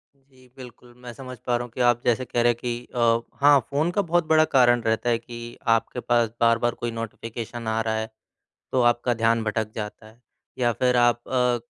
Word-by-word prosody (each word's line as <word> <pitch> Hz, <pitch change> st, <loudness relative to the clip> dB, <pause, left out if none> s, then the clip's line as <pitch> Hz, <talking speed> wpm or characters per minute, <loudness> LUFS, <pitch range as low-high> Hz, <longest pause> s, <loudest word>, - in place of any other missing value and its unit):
जी। 130 Hz, -2 st, -24 dB
बिल्कुल, 125 Hz, -1 st, -13 dB
मैं 125 Hz, -1 st, -10 dB
समझ 125 Hz, +1 st, -9 dB
पा 120 Hz, -, +2 dB
रहा 120 Hz, -, -4 dB
हूँ 120 Hz, -, -10 dB
कि 125 Hz, -, -4 dB
आप 120 Hz, -1 st, +3 dB
जैसे 120 Hz, +1 st, +1 dB
कह 120 Hz, -, -1 dB
रहे 120 Hz, 0 st, +4 dB
हैं -, -, -4 dB
कि 120 Hz, 0 st, -4 dB
अ 115 Hz, -1 st, +3 dB, 0.3 s
हाँ 145 Hz, -1 st, +7 dB
फ़ोन 150 Hz, +5 st, 0 dB
का 205 Hz, -, +1 dB
बहुत 175 Hz, -2 st, 0 dB
बड़ा 155 Hz, 0 st, +5 dB
कारण 120 Hz, -2 st, +5 dB
रहता 110 Hz, +1 st, 0 dB
है 115 Hz, -, +2 dB
कि 120 Hz, 0 st, -10 dB, 0.2 s
आपके 115 Hz, +2 st, -3 dB
पास 120 Hz, -2 st, +1 dB
बार-बार 115 Hz, +1 st, +2 dB
कोई 120 Hz, -, -4 dB
नोटिफ़िकेशन 115 Hz, +1 st, -6 dB
आ 110 Hz, 0 st, 0 dB
रहा 110 Hz, -1 st, -1 dB
है। 110 Hz, 0 st, -3 dB, 0.6 s
तो 130 Hz, -, +2 dB
आपका 120 Hz, 0 st, +2 dB
ध्यान 115 Hz, 0 st, +1 dB
भटक 110 Hz, 0 st, -2 dB
जाता 105 Hz, 0 st, -7 dB
है। 110 Hz, +2 st, -19 dB, 0.4 s
या 120 Hz, -1 st, +2 dB
फिर 125 Hz, +2 st, +1 dB
आप 120 Hz, 0 st, +3 dB
अ 125 Hz, -2 st, +1 dB
120 Hz, 215 wpm, -24 LUFS, 115-125 Hz, 0.6 s, हाँ